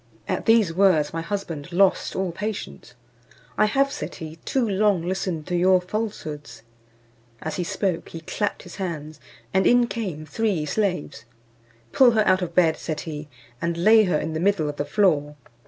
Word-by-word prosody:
At - - -2
these 225 -7 +4
words 170 -5 +3
my 165 - -2
husband 170 -4 -5
lost 190 +2 +2
all 190 -2 -1
patience. 190 - -6 0.6
"I - - +4
have," 275 +6 +2
said - - -6
he, 160 0 -8
"too 260 -4 +1
long 200 -3 +2
listened 180 -4 -2
to 180 - -2
your 185 +1 +4
falsehoods." 155 - -5 0.8
As 155 - -5
he 180 - -1
spoke 180 0 -2
he 165 - -8
clapped 205 +5 -3
his - - -11
hands, 155 -5 -5 0.3
and 190 0 +3
in 245 0 +5
came 190 -10 -5
three 190 -1 -1
slaves: 180 -3 -2 0.7
"Pull 250 -3 +6
her 215 -2 +3
out 185 0 +3
of 170 -2 -4
bed," 165 -3 +4
said 155 -2 -4
he, 150 -2 -7 0.3
"and 170 0 -1
lay 215 +5 +6
her 180 -5 +1
in 160 +1 -3
the 160 - -2
middle 185 -3 +1
of 145 0 -5
the 145 - -2
floor." 150 -8 +1
180 Hz, 175 wpm, -24 LUFS, 155-205 Hz, 0.8 s, Pull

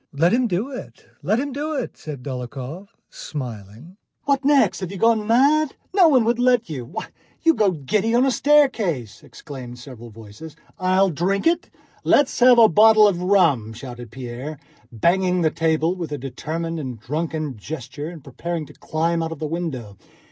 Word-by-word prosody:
"Let 165 +7 +2
him 245 0 +2
do 210 +8 -2
it, 255 - -9 0.2
let 220 - +1
him 285 +1 -3
do 300 +3 -3
it," 260 -4 -4
said 145 -5 -8
Dólokhov, 135 +7 -6 0.2
smiling. 125 - -8 0.3
"What 280 -1 +1
next? 285 0 +3
Have 185 -2 -5
you 200 - -6
gone 220 +1 +2
mad?... 280 +5 +3 0.2
No 370 -4 +7
one 260 -7 +4
would 235 +1 +1
let 245 -7 +2
you!... 130 -5 -5
Why, - - -7 0.3
you 330 -1 +5
go 210 -8 +2
giddy 185 +6 -1
even 235 +2 +3
on - - +4
a - - +2
staircase," 230 - +1
exclaimed 125 -5 -10
several 120 -2 -11
voices. 110 +8 -12 0.2
"I'll 185 +1 +2
drink 185 +6 -1
it! 335 +1 +1 0.3
Let's 285 -1 +3
have 250 0 +7
a 230 -1 +8
bottle 215 +3 +6
of 180 -4 -1
rum!" 165 - +2
shouted 120 0 -9
Pierre, 130 +5 -7 0.3
banging 180 - +1
the 160 -2 +2
table 160 +1 +1
with 170 -5 -6
a 145 - -3
determined 160 +5 -5
and 130 -6 -6
drunken 155 +2 -3
gesture 135 +5 -7
and 165 -5 -11
preparing 160 +4 -5
to - - -15
climb 165 +1 -1
out 165 0 -3
of 165 - -6
the 155 - -4
window. 140 - -5
165 Hz, 180 wpm, -22 LUFS, 135-220 Hz, 0.3 s, a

